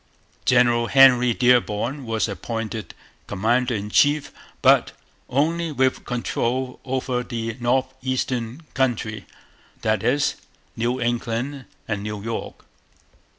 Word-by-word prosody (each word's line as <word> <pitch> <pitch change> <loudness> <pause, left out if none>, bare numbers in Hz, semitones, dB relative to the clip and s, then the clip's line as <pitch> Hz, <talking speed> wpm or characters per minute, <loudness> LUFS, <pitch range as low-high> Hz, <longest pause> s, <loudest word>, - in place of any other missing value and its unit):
General 120 -1 +4
Henry 125 -2 +6
Dearborn 125 +2 +1
was 115 0 0
appointed 110 0 -5 0.3
commander 120 +5 +1
in 105 0 -4
chief, 145 +3 +3 0.3
but - - +5 0.4
only 165 +5 0
with 130 -2 0
control 125 +1 -2
over 130 -1 -1
the 115 -2 -4
north 130 +2 +1
eastern 130 0 -2
country, 115 -5 -1 0.6
that - - +1
is, - - +1 0.4
New 120 +3 -1
England 120 +3 -2 0.2
and 105 -2 -2
New 105 0 -4
York. 115 0 -5
120 Hz, 110 wpm, -23 LUFS, 115-130 Hz, 0.6 s, Henry